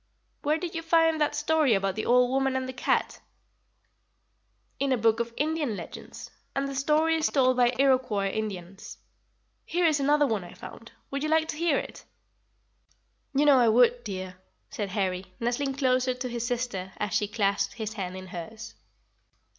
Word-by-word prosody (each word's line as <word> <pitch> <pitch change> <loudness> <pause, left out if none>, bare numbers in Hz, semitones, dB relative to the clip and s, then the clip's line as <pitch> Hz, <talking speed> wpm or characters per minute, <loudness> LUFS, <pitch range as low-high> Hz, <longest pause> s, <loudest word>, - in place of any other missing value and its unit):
"Where 300 +1 +1
did 345 0 -5
you 330 - -3
find 325 -1 +3
that 300 - +1
story 310 -7 +2
about 195 0 0
the 220 - -4
old 250 +1 +4
woman 270 0 +1
and 260 0 -1
the 260 - -5
cat?" - - 0 1.6
"In 275 0 0
a 255 - +3
book 225 0 +2
of 235 0 -2
Indian 300 -6 -1
legends, - - -9 0.2
and 275 0 0
the 275 - -5
story 305 +4 +2
is 315 - +1
told 255 -2 +3
by 245 -1 +5
the 250 - -6
Iroquois 250 -8 +2
Indians. 195 -3 -6 0.7
Here 350 0 0
is 310 -3 +3
another 290 +1 +3
one 220 -7 -1
I 175 - -12
found. 230 - -11 0.2
Would 275 0 -2
you 305 - -1
like 320 0 +2
to - - -3
hear 325 -2 +1
it?" - - -6 1.3
"You 290 +2 +3
know 280 -3 +6
I 240 - +4
would, 240 +1 +4
dear," 185 -2 -6 0.3
said 210 -8 -3
Harry, 190 -2 -2
nestling 255 +4 -1
closer 255 -2 +1
to 255 0 -4
his 235 -1 -3
sister, 235 -7 -3
as 205 -3 -3
she 210 - +1
clasped 200 -2 0
his 220 -2 -4
hand 185 -3 -5
in 185 - -8
hers. 215 +6 -8
250 Hz, 180 wpm, -27 LUFS, 210-285 Hz, 1.6 s, know